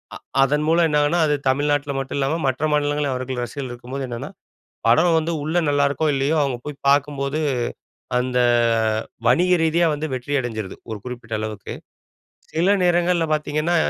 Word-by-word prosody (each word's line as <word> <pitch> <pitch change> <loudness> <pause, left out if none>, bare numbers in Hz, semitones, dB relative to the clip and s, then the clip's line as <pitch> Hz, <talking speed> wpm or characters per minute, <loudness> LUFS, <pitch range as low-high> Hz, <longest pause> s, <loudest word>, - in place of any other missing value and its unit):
அ - - -6 0.2
அதன் 150 +2 +2
மூலம் 165 +1 +4
என்னாகுன்னா, 150 +2 +2
அது 150 - +2
தமிழ்நாட்டில 145 +1 +1
மட்டும் 135 +1 -3
இல்லாம 140 +4 0
மற்ற 130 +2 -1
மாநிலங்கள்லயும், 145 -1 +1
அவர்களுக்கு 125 -1 -3
ரசிகர்கள் 130 +2 -6
இருக்கும்போது 125 +3 -6
என்னன்னா, 120 -1 -6 0.6
படம் 165 +9 +4
வந்து 160 +1 0
உள்ள 160 +3 -1
நல்லா 145 0 +3
இருக்கோ, 155 +3 -1
இல்லையோ, 140 +3 +1
அவங்க 135 -3 -1
போயி 150 -1 -5
பார்க்கும்போது, 140 +1 +1 0.8
அந்த 125 0 0 0.9
வணிக 180 +7 +4
ரீதியா 165 +1 +3
வந்து 150 +2 -3
வெற்றி 135 +3 -2
அடைஞ்சிருது, 110 -6 -5
ஒரு 110 - -4
குறிப்பிட்ட 120 -3 -6
அளவுக்கு. 110 -2 -5 0.8
சில 180 +5 +3
நேரங்கள்ல 175 -1 +2
பாத்தீங்கன்னா, 155 +2 0
145 Hz, 150 wpm, -22 LUFS, 130-155 Hz, 0.9 s, மூலம்